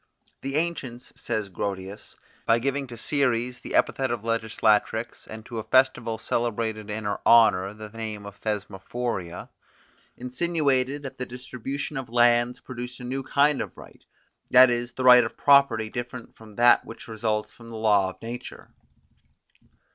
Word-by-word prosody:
The 135 +1 -3
ancients, 140 -7 -3
says 105 -2 -3
Grotius, 95 +2 -6 0.3
by 115 - +5
giving 135 +3 -2
to 120 -1 -9
Ceres 125 -2 0
the - - -6
epithet 130 -1 +2
of 120 -3 -3
Legislatrix, 110 0 0
and 110 0 -9
to 115 -2 -6
a - - -5
festival 125 -3 +2
celebrated 110 -2 -2
in 110 +1 -4
her 100 0 -2
honour 100 -5 +5
the 110 0 -9
name 110 -2 -6
of 100 +2 -11
Thesmorphoria, 105 -2 -4 0.7
insinuated 140 0 0
that 135 - -8
the 125 - -3
distribution 130 +3 -6
of 130 -3 -5
lands 120 +1 +3
produced 125 -1 -7
a - - -9
new 130 +2 -3
kind 145 +2 +2
of - - -7
right; - - -14 0.5
that 125 0 +7
is, 120 0 -2
the 130 - -4
right 125 -1 +8
of - - -6
property 135 -6 +4
different 120 -1 -7
from 110 -2 -15
that 120 +2 +5
which 115 - -11
results 110 -1 -2
from 115 - -15
the 115 - -8
law 105 -3 +3
of 95 - -12
nature. 120 +2 -8
120 Hz, 155 wpm, -25 LUFS, 110-130 Hz, 0.7 s, right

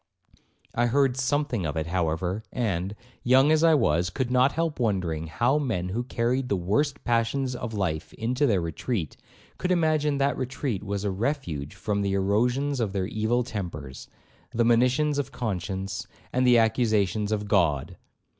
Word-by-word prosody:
I 120 +1 +2
heard 135 +1 +2
something 130 -4 0
of 75 0 -2
it, 80 - -1
however, 90 +3 -1
and, 100 -5 -2 0.3
young 130 +4 +5
as 155 0 +3
I 165 -1 +6
was, 85 - +2
could 125 +7 -2
not 130 +2 +4
help 165 -2 -1
wondering 90 -8 -1
how 120 - +1
men 105 -11 -2
who 110 +6 -1
carried 125 +2 -1
the - - +2
worst 120 - 0
passions 125 +3 0
of 120 -2 -5
life 80 -6 -2
into 125 +6 0
their 100 -6 +2
retreat, 85 - -3 0.4
could 180 - -1
imagine 155 -4 +2
that 140 +1 +1
retreat 130 -5 -3
was 100 -1 -3
a 100 - 0
refuge 95 - -3
from 100 -1 -1
the 100 -1 0
erosions 120 +8 +1
of 110 -4 -1
their 95 -2 0
evil 110 +4 0
tempers, 85 - -6 0.4
the 115 0 +1
monitions 125 +5 +3
of 135 -1 -3
conscience, 95 -4 -3 0.3
and 125 0 +2
the 120 -1 +6
accusations 110 -3 +2
of 105 -1 -1
God. 85 -10 +1
115 Hz, 165 wpm, -26 LUFS, 95-130 Hz, 0.4 s, I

